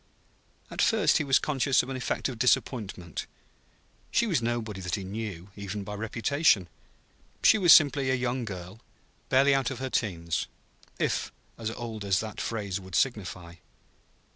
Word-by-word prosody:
At - - -2
first 225 -5 +3
he - - 0
was 135 -2 +4
conscious 135 -2 +2
of - - -8
an 135 - -3
effect 130 - -2
of 125 -4 -7
disappointment. 105 - 0 0.8
She 235 - +2
was 170 - +1
nobody 115 -4 -2
that 90 -2 -2
he 100 - -5
knew, 100 -2 -6
even 100 0 -5
by 105 - -6
reputation. 110 - +1 0.8
She 220 - +6
was 175 -4 +6
simply 140 -3 +6
a 130 - +3
young 125 0 -1
girl, 95 -1 -7 0.5
barely 135 +2 +5
out 135 -2 +1
of 135 - -5
her 130 +1 -4
teens 85 -6 -1 0.5
if - - -1 0.2
as 115 -1 -4
old 115 -2 -6
as 95 -3 +2
that 110 -1 -5
phrase 100 -4 -3
would 95 -2 -8
signify. 90 -8 -1
115 Hz, 160 wpm, -28 LUFS, 95-130 Hz, 0.8 s, She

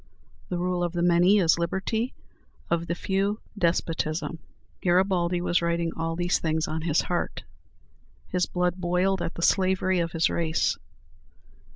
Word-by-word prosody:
The 180 - -2
rule 180 0 -1
of 175 -1 -2
the 175 -1 0
many 175 +3 +5
is 170 -3 +3
liberty; 195 +8 -1 0.6
of 170 0 0
the 170 - -1
few, 195 +4 -1 0.2
despotism. 165 -3 -1 0.4
Garibaldi 180 -1 +2
was 175 0 +1
writing 170 0 0
all 165 0 -2
these 175 +1 +1
things 160 -1 0
on 160 0 -3
his 160 -1 +2
heart. 175 - -3 0.9
His 180 -1 0
blood 180 0 0
boiled 180 +1 +1
at 165 - -3
the 170 - -4
slavery 185 -1 +2
of 165 -1 -2
his 165 -1 +3
race. 165 -2 0
175 Hz, 150 wpm, -26 LUFS, 170-185 Hz, 0.9 s, many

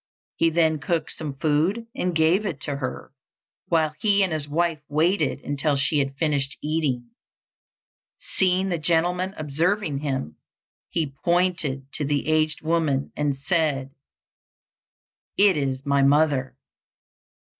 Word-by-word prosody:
He 165 - +3
then 160 -1 +2
cooked 160 +2 -1
some 150 -3 -6
food 160 +11 +1
and 180 -2 -1
gave 160 +6 +3
it 175 -9 -3
to 140 -1 -2
her, 130 -1 -5 0.6
while 160 -2 +2
he 205 -2 +3
and 185 -4 0
his 150 -2 -2
wife 165 0 0
waited 155 -1 +1
until 145 +1 0
she 145 +2 +2
had 135 -1 -1
finished 145 -3 0
eating. 140 -6 -2 1.1
Seeing 190 +1 +1
the 170 -3 -1
gentleman 175 +4 +1
observing 155 +2 0
him, 135 - -3 0.5
he 155 -5 -2
pointed 170 -6 +1
to - - -1
the 145 0 0
aged 155 -1 +1
woman 155 -4 0
and 145 -2 -1
said, 140 -3 0 1.5
"It 200 -2 +5
is 135 -2 -2
my 140 0 +2
mother." 140 -2 +2
155 Hz, 130 wpm, -24 LUFS, 140-170 Hz, 1.5 s, It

